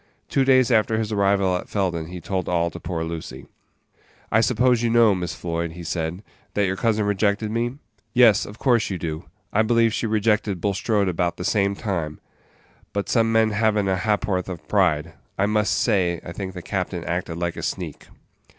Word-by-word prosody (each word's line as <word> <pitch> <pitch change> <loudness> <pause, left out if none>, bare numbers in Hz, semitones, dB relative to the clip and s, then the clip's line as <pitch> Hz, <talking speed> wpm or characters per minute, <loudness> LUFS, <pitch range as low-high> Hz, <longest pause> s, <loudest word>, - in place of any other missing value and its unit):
Two 135 - +2
days 130 -1 +4
after 110 -1 +3
his 110 -1 -2
arrival 100 -2 +2
at 90 - -5
Felden 90 -5 -1
he 90 +1 -7
told 95 0 -3
all 85 -1 +1
to - - -8
poor 85 -3 -3
Lucy. 80 -5 -6 0.9
"I 110 - +4
suppose 125 +1 +3
you 120 - +1
know, 115 -2 +5
Miss 90 -2 -3
Floyd," 85 -1 -3
he 85 +1 -9
said, 85 +3 -3 0.3
"that 105 - +2
your 95 0 -1
cousin 110 0 +1
rejected 105 +1 0
me? 120 +2 -1 0.4
Yes, 120 -2 +5
of 105 - -10
course 120 -4 +2
you 95 - -2
do; 80 -1 -5 0.3
I 110 - +4
believe 115 0 +3
she 115 - -1
rejected 105 -3 +1
Bulstrode 100 +2 0
about 85 -1 -1
the 90 - -5
same 100 0 +1
time; 85 -8 -3 0.7
but 100 0 -2
some 115 -2 +2
men 110 -1 +3
have 110 0 +2
n't 100 -2 +1
a 95 - +1
ha'porth 100 -2 0
of 90 -3 -7
pride; 75 +2 +1 0.2
I 95 - +2
must 105 0 +1
say 90 -7 +1
I - - -6
think 95 +1 -6
the 90 - -7
captain 90 -3 -3
acted 85 -1 -3
like 85 -1 -2
a - - -6
sneak." - - -5
100 Hz, 195 wpm, -23 LUFS, 90-110 Hz, 0.9 s, know